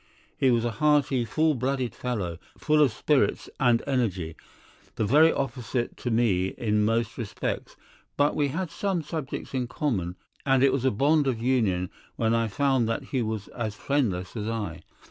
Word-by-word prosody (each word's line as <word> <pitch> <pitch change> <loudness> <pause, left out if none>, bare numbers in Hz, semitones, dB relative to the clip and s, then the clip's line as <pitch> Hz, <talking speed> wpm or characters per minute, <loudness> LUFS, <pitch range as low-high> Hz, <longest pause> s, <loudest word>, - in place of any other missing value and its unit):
He 135 - +3
was 120 -1 +2
a 120 - 0
hearty, 140 0 +2
full 155 +6 +2
blooded 130 -1 -1
fellow, 100 -10 -3 0.2
full 155 -1 +3
of 140 -5 +5
spirits 135 +6 +1
and 120 -3 +3
energy, 95 - -1 0.6
the 110 - 0
very 150 +9 +6
opposite 125 -2 -2
to 125 - -3
me 100 -6 +1
in 105 -2 +1
most 115 +3 0
respects, 115 -4 -4 0.4
but 145 +1 +3
we 145 - +2
had 165 +4 -3
some 190 -5 -1
subjects 150 -4 -5
in 125 -2 -1
common, 95 - -2 0.3
and 135 -1 +3
it 135 -1 +5
was 135 -1 0
a - - +5
bond 145 +6 +2
of 125 -4 0
union 110 -8 +1 0.2
when 115 0 +1
I 115 0 +2
found 130 0 +1
that 115 - -1
he 130 - +1
was 110 -3 -3
as 110 -4 -4
friendless 105 -10 -1
as 105 -1 -3
I. 110 -7 -3
120 Hz, 175 wpm, -27 LUFS, 110-140 Hz, 0.6 s, very